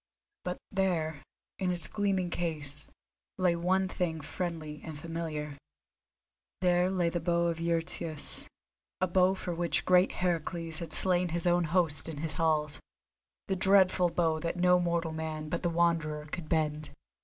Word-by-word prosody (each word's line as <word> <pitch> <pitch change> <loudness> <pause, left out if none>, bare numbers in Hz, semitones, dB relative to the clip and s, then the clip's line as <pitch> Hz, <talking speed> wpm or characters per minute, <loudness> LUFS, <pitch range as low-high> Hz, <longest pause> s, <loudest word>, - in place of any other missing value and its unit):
But 180 0 -3
there, 165 -6 0 0.4
in 185 -2 0
its 175 -3 -1
gleaming 195 -4 0
case, 150 -4 -3 0.5
lay 180 -2 +3
one 185 +3 +1
thing 170 -3 -2
friendly 155 -1 -5
and 160 -2 -7
familiar. 155 -2 -5 1.0
There 180 0 +3
lay 180 -3 +1
the 175 - -2
Bow 170 0 +1
of 165 -1 -3
Eurytus, 165 -2 -2 0.5
the 185 - +3
bow 185 +1 +3
for 180 -2 -4
which 170 0 0
great 180 0 +4
Heracles 165 -2 -1
had 170 - -6
slain 180 -1 +4
his 170 +1 -1
own 175 0 +3
host 160 -3 +1
in 155 - -6
his 155 +1 -1
halls; 155 -3 +1 0.7
the 190 - 0
dreadful 190 -2 +5
bow 165 -2 +1
that 165 +2 -2
no 180 0 +5
mortal 170 -2 0
man 160 -1 -4
but 170 - -2
the 175 - +1
Wanderer 165 -3 +1
could 155 +1 -6
bend. 155 -1 0
170 Hz, 155 wpm, -30 LUFS, 160-180 Hz, 1.0 s, dreadful